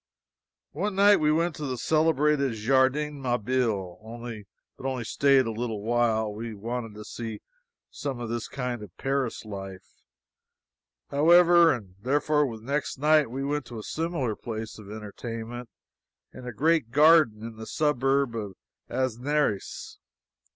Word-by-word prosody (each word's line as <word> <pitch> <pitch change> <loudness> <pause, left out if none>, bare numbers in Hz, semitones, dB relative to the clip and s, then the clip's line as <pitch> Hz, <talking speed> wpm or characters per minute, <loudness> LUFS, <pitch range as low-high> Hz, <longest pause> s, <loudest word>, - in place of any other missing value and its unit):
One 190 +6 -2
night 205 +1 +6
we 150 0 +2
went 165 +2 +1
to 150 - -4
the 130 -1 -3
celebrated 150 -2 +2
Jardin 135 +6 +1
Mabille, 120 -6 -1 0.8
but 135 - -5
only 130 -3 -2
staid 135 +2 +3
a 115 - -2
little 110 -2 -4
while. 110 -2 +1
We 110 +1 -6
wanted 115 +1 -5
to 105 0 -9
see 115 -1 -6 0.5
some 135 -4 -4
of 120 - -4
this 115 0 -3
kind 125 -3 -4
of 100 -4 -12
Paris 135 -4 -2
life, 95 -2 -9 1.1
however, 170 +3 +6
and 100 -8 -5
therefore 145 +3 +2
the 110 - -16
next 140 +3 -2
night 150 -1 +4
we 135 +3 -4
went 145 0 -2
to 120 - -8
a 110 - -6
similar 155 -8 -2
place 110 -1 -6
of 100 -2 -12
entertainment 115 +3 -7 0.6
in 125 - -10
a - - -3
great 155 +1 +2
garden 145 -5 +5
in 115 -1 -7
the 110 0 -8
suburb 135 -3 +1
of 105 -4 -5 0.3
Asnieres. 130 -2 -1
125 Hz, 145 wpm, -27 LUFS, 110-150 Hz, 1.1 s, night